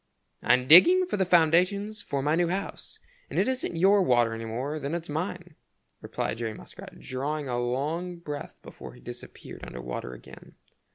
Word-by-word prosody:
"I'm 125 +1 +3
digging 355 - +8
for 355 - -3
the 190 - +2
foundations 185 +5 +3
for 140 -1 -3
my 150 +2 +1
new 170 +1 +2
house, 190 +3 -5 0.3
and - - -6
it - - +2
isn't 260 -8 -2
your 195 +4 +4
water 120 -8 +3
any 115 0 -6
more 130 +7 -4
than 145 +3 -3
it's 170 -2 -5
mine," 175 +2 -4 0.5
replied 110 - -4
Jerry 110 -2 -3
Muskrat, - - -12
drawing 145 +3 -4
a 120 -1 -1
long 150 +9 -2
breath 150 -4 -7
before - - -11
he - - -16
disappeared 120 0 -10
under 60 - -8
water 60 0 -6
again. 60 - -14
155 Hz, 175 wpm, -27 LUFS, 125-180 Hz, 0.5 s, digging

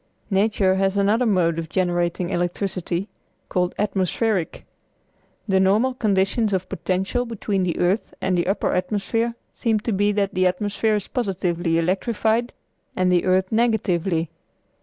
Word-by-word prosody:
Nature 195 -1 +2
has 195 +1 +1
another 215 +5 +2
mode 170 -5 +2
of 160 -1 -5
generating 175 0 0
electricity, 175 +1 -2 0.4
called 180 -1 0
atmospheric. 200 -1 -1 0.8
The 190 -2 +3
normal 210 +7 +3
conditions 210 -1 +1
of 185 -1 -1
potential 190 +8 -1
between 210 -4 -2
the 180 -3 -1
earth 185 +5 0
and 190 - 0
the 175 0 0
upper 195 - 0
atmosphere 225 +5 -1 0.2
seem 225 -2 0
to 230 - -2
be 205 +1 +2
that 200 -1 0
the 185 0 +3
atmosphere 205 +4 0
is 205 - -3
positively 180 -7 -1
electrified 220 +7 0 0.4
and 185 0 +2
the 175 -1 +2
earth 185 0 +2
negatively. 190 -8 +1
195 Hz, 140 wpm, -23 LUFS, 180-215 Hz, 0.8 s, The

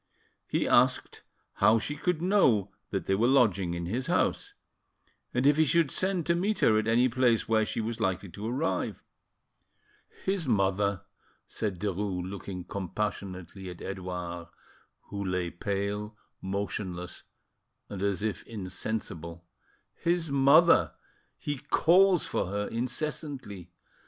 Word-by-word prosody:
He - - 0
asked - - +3 0.4
how 110 +3 +5
she 115 +7 -3
could 170 +2 -1
know 125 - +3 0.2
that 95 - -2
they - - +1
were 110 +5 +3
lodging 100 -10 +3
in 85 0 -4
his 120 +9 -2
house, - - 0 0.8
and 125 +2 0
if 145 +1 +5
he 160 - +6
should 160 -1 +2
send 185 -3 0
to 170 - +3
meet 195 +5 0
her 110 -1 +5
at 110 - -2
any 120 +3 +4
place 120 -2 +2
where 110 -1 +3
she - - -3
was 115 +1 -4
likely 95 -2 -1
to 105 +5 -6
arrive. 135 +7 -2 1.2
"His 190 -5 0
mother," 100 -2 +1 0.4
said 100 -5 -3
Derues, 95 -2 -2
looking 95 -1 -6
compassionately 95 -1 -4
at 90 - -9
Edouard, 90 -3 -5 0.6
who 100 0 -3
lay 90 -2 -1
pale, 100 +3 -3 0.2
motionless, 95 -2 -4 0.7
and 100 -2 -7
as 100 0 0
if 110 -2 -2
insensible,—"his 95 - -4
mother! 140 +5 +5 0.4
He 145 -2 -4
calls 180 +5 +4
for - - -1
her 100 +2 -2
incessantly. 125 - -4
105 Hz, 130 wpm, -29 LUFS, 95-135 Hz, 1.2 s, he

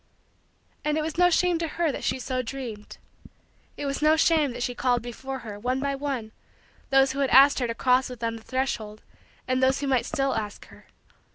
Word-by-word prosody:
And 300 0 0
it 310 - 0
was 315 0 -4
no 355 0 +6
shame 355 -1 +2
to 330 - -1
her 335 -3 +2
that - - -6
she - - 0
so 255 0 -2
dreamed. 235 -4 -7 0.8
It 290 - -4
was 275 +1 -2
no 305 +1 +5
shame 315 -3 +3
that 240 0 -4
she 245 - -2
called 245 -1 0
before 265 +2 -6
her, 205 -2 -7
one 250 +4 -1
by 280 +1 -1
one, 270 -6 -4 0.6
those 270 -1 +4
who 275 - -5
had 275 -2 +1
asked 275 +2 +7
her 245 - 0
to 230 - -3
cross 255 +1 +2
with 250 -2 -9
them 230 -1 -2
the 220 - -14
threshold 225 -5 -3 0.4
and 255 0 +1
those 260 +1 +2
who - - -1
might 260 -3 +1
still 270 -1 0
ask 210 -2 -5
her. - - -17
265 Hz, 215 wpm, -26 LUFS, 245-280 Hz, 0.8 s, asked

